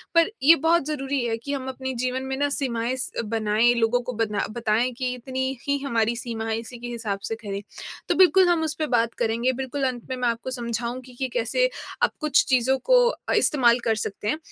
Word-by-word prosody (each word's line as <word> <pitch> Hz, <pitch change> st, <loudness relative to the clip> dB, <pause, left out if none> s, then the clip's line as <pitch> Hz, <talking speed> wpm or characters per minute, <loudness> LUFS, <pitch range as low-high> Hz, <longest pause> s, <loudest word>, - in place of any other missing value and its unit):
पर 335 Hz, +5 st, +5 dB
ये 325 Hz, +4 st, +8 dB
बहुत 335 Hz, -4 st, +4 dB
ज़रूरी 275 Hz, -3 st, -2 dB
है 225 Hz, -1 st, -1 dB
कि 280 Hz, +5 st, -5 dB
हम 265 Hz, -1 st, -4 dB
अपने 260 Hz, 0 st, -4 dB
जीवन 255 Hz, +1 st, -2 dB
में 265 Hz, 0 st, -3 dB
ना 285 Hz, 0 st, +1 dB
सीमाएँ 250 Hz, -3 st, -1 dB
स 255 Hz, -, -3 dB
अ, -, -, +1 dB
बनाएँ, 220 Hz, +1 st, +2 dB
लोगों 235 Hz, +1 st, +2 dB
को 250 Hz, -, -5 dB
बना 210 Hz, -1 st, -1 dB
बताएँ 230 Hz, +2 st, 0 dB
कि, 255 Hz, -1 st, -1 dB
"इतनी 260 Hz, +1 st, -3 dB
ही 280 Hz, -, +2 dB
हमारी 235 Hz, -3 st, +1 dB
सीमा 230 Hz, -2 st, -4 dB
है, 220 Hz, -, 0 dB
इसी 235 Hz, +2 st, -9 dB
के 240 Hz, -, -6 dB
हिसाब 225 Hz, -4 st, -3 dB
से 225 Hz, -, -3 dB
करें।" 200 Hz, -1 st, -4 dB, 0.5 s
तो -, -, +3 dB
बिल्कुल, 375 Hz, 0 st, +6 dB
हम 345 Hz, -2 st, +2 dB
उसपे 310 Hz, 0 st, -2 dB
बात 230 Hz, 0 st, +1 dB
करेंगे, 235 Hz, +3 st, +1 dB
बिल्कुल, 265 Hz, +2 st, -3 dB
अंत 245 Hz, -1 st, -6 dB
में 260 Hz, -, -2 dB
मैं 250 Hz, -, 0 dB
आपको 235 Hz, +3 st, -3 dB
समझाऊँगी 240 Hz, +1 st, -4 dB
कि 265 Hz, -, 0 dB
कैसे 250 Hz, -, +1 dB, 0.3 s
आप -, -, +4 dB
कुछ 300 Hz, -2 st, +3 dB
चीज़ों 260 Hz, +1 st, +3 dB
को -, -, +5 dB
अ, -, -, -4 dB
इस्तेमाल 245 Hz, -5 st, +4 dB
कर 225 Hz, -1 st, +2 dB
सकते 210 Hz, -1 st, -4 dB
हैं। 305 Hz, -, +1 dB
250 Hz, 220 wpm, -24 LUFS, 230-275 Hz, 0.5 s, ये